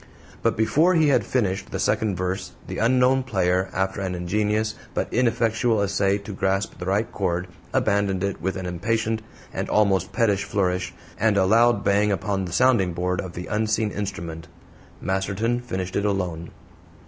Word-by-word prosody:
But - - +1
before 155 +11 +3
he 160 -3 +4
had 140 - +3
finished 100 -6 -1
the - - -3
second 105 -4 +1
verse 90 +1 -3
the - - -5
unknown 125 +3 +4
player, 95 -6 0
after 95 +2 -1
an 95 -2 -2
ingenious 105 +5 0 0.2
but - - -2
ineffectual 115 -1 +2
essay 100 0 +1
to 105 0 -8
grasp 95 0 -1
the 90 - -5
right 100 +4 0
chord, 90 -2 -1 0.2
abandoned 100 -2 +1
it 100 -1 -2
with 95 +2 -1
an 95 - -5
impatient 110 +5 -1 0.3
and - - -3
almost 95 -3 +2
pettish 105 -5 +1
flourish, 90 -2 -1 0.3
and 110 -1 +3
a 95 - +4
loud 115 +1 +4
bang 105 +1 +3
upon 100 -1 -1
the 90 - -6
sounding 100 -4 +3
board 90 +1 -1
of 90 -2 -8
the 90 - -6
unseen 110 0 0
instrument. 85 -6 -5 0.5
Masterton 100 +5 -1
finished 95 -7 -4
it 100 - +1
alone. 90 -5 -2
100 Hz, 165 wpm, -24 LUFS, 95-110 Hz, 0.5 s, he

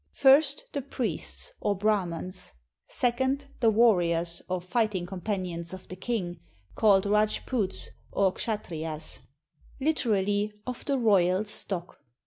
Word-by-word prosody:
First, 280 - +5
the 280 - -1
priests, 280 - -3
or 205 - 0
Brahmans. 185 - -1 0.3
Second, 260 +3 0
the 230 - +4
warriors 175 -7 +3
or 185 0 0
fighting 195 -1 0
companions 180 -2 -3
of 185 - -13
the 185 - -6
king, 185 -4 -3 0.3
called 200 -3 +4
Rajputs 210 0 0 0.2
or 190 -2 +2
Kshattriyas, 160 -8 -3 0.6
literally, 210 -8 +1
"of 250 -1 -5
the 280 -1 +1
royal 195 -4 +3
stock." 190 -4 -2
205 Hz, 115 wpm, -28 LUFS, 180-235 Hz, 0.6 s, First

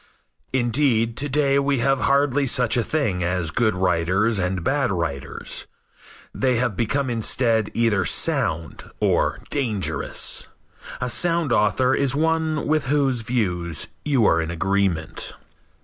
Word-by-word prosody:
Indeed, 120 -2 +1
to 145 - -1
day 140 0 +2
we 140 0 +1
have 135 +2 +1
hardly 140 0 +2
such 125 -2 +2
a 120 - +2
thing 110 - -1
as 85 -2 -1
good 110 0 +1
writers 90 +4 +1
and 90 -1 -1
bad 135 -1 +1
writers. 80 -7 -4 0.7
They 130 -2 +1
have 120 -3 0
become 135 +6 0
instead 115 -1 0
either 115 -4 +2
"sound" 80 -1 0
or - - +1
"dangerous." 115 -9 -1 0.5
A 125 - -2
sound 165 +2 +1
author 125 +5 +2
is 140 0 +1
one 160 0 0
with 155 -1 +1
whose 135 -3 +1
views 90 - -2
you 135 -7 +2
are 80 -3 +3
in 80 - -4
agreement. 90 -2 -1
120 Hz, 135 wpm, -22 LUFS, 95-140 Hz, 0.7 s, are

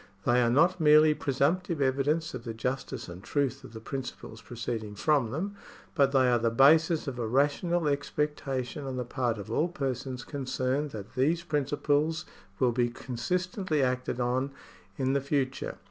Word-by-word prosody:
They 125 +1 +4
are 120 - +3
not 165 +9 +3
merely 155 0 +7
presumptive 150 +5 0
evidence 140 +4 +1
of 125 -2 -6
the 115 -2 -5
justice 130 +1 -3
and 90 +1 -9
truth 140 -4 -1
of - - -11
the 110 - -8
principles 125 -2 -7
proceeding 115 -3 -5
from 140 0 +2
them, 175 - -3 0.4
but 140 -4 +3
they 130 -2 +4
are 120 -1 +3
the 115 0 +2
basis 155 +7 +4
of 125 -3 -4
a 115 - -1
rational 150 +7 +1
expectation 145 -2 -2
on 130 -1 -4
the 125 - -2
part 120 -2 -1
of 105 +1 -7
all 155 +8 +2
persons 130 -6 -4
concerned 135 +1 -2
that 105 -5 -8
these 155 +6 +1
principles 150 +1 0 0.3
will 125 -2 +3
be 120 0 +1
consistently 155 - -2
acted 125 -1 -1
on 125 +2 0 0.5
in 130 0 +1
the 140 - +1
future. 135 -1 -2
135 Hz, 165 wpm, -29 LUFS, 125-150 Hz, 0.5 s, merely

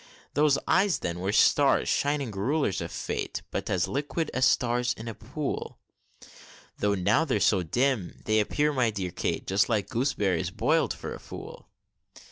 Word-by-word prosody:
Those 145 -1 +3
eyes, 190 -4 +3
then, 85 0 -4
were 95 +2 -1
stars, 140 +6 +4
shining 140 -4 0
rulers 105 - 0
of - - -5
fate! - - -4
But - - -3
as 95 0 +1
liquid 145 +3 -2
as 130 0 +3
stars 125 0 +2
in 110 - -9
a 115 - -4
pool; 130 +7 -5 1.0
Though 100 0 +2
now 105 - +2
they're 130 -9 0
so 100 -1 +3
dim, 120 - -1
they 110 0 +3
appear, 150 +8 +1
my 125 -4 +2
dear 95 -4 -4
Kate, - - -2
Just 100 +4 +2
like 105 -4 0
gooseberries 105 - 0
boil'd - - +1
for - - -5
a - - -8
fool! - - -10
115 Hz, 165 wpm, -27 LUFS, 100-140 Hz, 1.0 s, stars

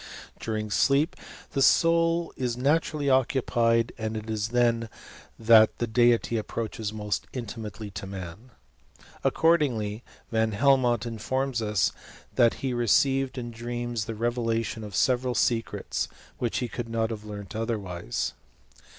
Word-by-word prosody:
During 110 -1 -3
sleep 140 - +3 0.4
the 140 - -1
soul 165 +3 +3
is 125 -2 -2
naturally 150 +2 +1
occupied, 120 -4 +2
and 110 0 -2
it 110 +1 -5
is 110 -1 -1
then 115 -1 +1 0.5
that 110 -1 +6
the 120 - 0
deity 120 0 +3
approaches 110 0 -3
most 105 -1 -3
intimately 110 -3 -6
to 95 0 -6
man. 95 +4 -8 0.7
Accordingly, 125 -10 +2 0.3
Van 110 -1 +1
Helmont 120 -1 +3
informs 120 +2 -2
us, 105 -4 +1 0.4
that 115 -1 +4
he 130 - 0
received 135 +3 +2
in 120 -1 -4
dreams, 120 -1 -4
the 115 - -5
revelation 115 -1 -1
of 105 -2 -7
several 125 -1 +2
secrets, 115 -2 0 0.3
which 120 -2 -1
he 125 - -1
could 120 0 -5
not 115 0 0
have 105 -2 -5
learnt 100 -3 -8
otherwise. 100 - -3
115 Hz, 130 wpm, -27 LUFS, 110-125 Hz, 0.7 s, that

